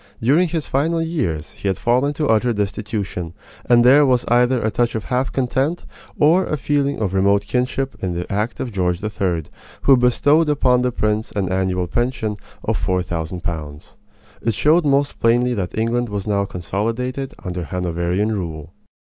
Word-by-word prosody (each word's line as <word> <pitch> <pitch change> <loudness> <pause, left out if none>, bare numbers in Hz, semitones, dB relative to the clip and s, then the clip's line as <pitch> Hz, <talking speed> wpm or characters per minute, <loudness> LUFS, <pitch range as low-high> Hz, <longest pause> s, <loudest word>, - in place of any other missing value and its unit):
During 150 +10 +3
his 165 -2 -2
final 160 +5 0
years 120 - -2
he - - -6
had 95 - 0
fallen 125 +4 +2
to 150 0 -1
utter 115 +1 +2
destitution, 100 -4 -3 0.3
and 120 0 +5
there 140 +4 +7
was 125 -3 +2
either 125 +1 +3
a 110 -1 -1
touch 120 +2 0
of 110 - -2
half 130 +1 -1
contempt 135 +5 -1 0.3
or 165 +6 +4
a 150 - -1
feeling 140 0 0
of 100 -4 -1
remote 100 +1 +3
kinship 125 +4 -1
in 90 -2 -2
the 90 +1 -3
act 105 +4 -2
of 125 - -3
George 90 -2 -1
III., 95 -6 -1 0.4
who 135 - +7
bestowed 145 +6 +3
upon 125 -4 +3
the 125 0 +1
prince 110 -1 -1
an 95 -3 -1
annual 95 -1 0
pension 120 +1 -1 0.3
of - - -1
four 90 -1 0
thousand 85 +1 -4
pounds. 75 -3 -6 0.5
It 115 -2 0
showed 155 +6 +3
most 140 0 +1
plainly 120 +2 +3
that 95 -5 -4
England 115 +2 0
was 100 -2 -4
now 100 -2 +1
consolidated 115 - -3
under 90 -1 -4
Hanoverian 90 +4 -1
rule. 85 -5 -5
110 Hz, 175 wpm, -20 LUFS, 95-130 Hz, 0.5 s, there